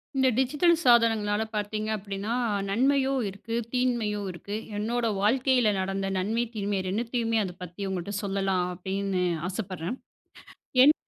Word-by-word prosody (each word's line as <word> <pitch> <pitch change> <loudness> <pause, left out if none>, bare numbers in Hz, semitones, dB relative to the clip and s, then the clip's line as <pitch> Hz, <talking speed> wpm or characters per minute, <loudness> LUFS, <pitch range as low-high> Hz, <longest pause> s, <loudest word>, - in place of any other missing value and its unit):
இந்த 265 -1 +4
டிஜிட்டல் 295 +7 +4
சாதனங்கள்னால 225 -3 +4
பார்த்தீங்க 215 +1 -2
அப்பிடின்னா, 200 +2 -4 0.4
நன்மையும் 265 +4 +2
இருக்கு, 205 +4 -6 0.2
தீமையும் 230 -5 0
இருக்கு. 200 +4 -6 0.2
என்னோட 235 +3 -1 0.2
வாழ்க்கையில 250 +2 +3
நடந்த 195 +1 -1
நன்மை, 220 +6 0
தீமை 200 -1 -1
ரெண்டுத்தையுமே 230 +2 0
அதபத்தி 180 0 -7
உங்களட்ட 190 +1 -3
சொல்லலாம் 195 -2 0
அப்பிடின்னு 190 +1 -2 0.2
ஆசைப்பட்றேன் 185 +2 -4 0.8
என் 290 +4 +8
210 Hz, 115 wpm, -27 LUFS, 195-240 Hz, 0.8 s, என்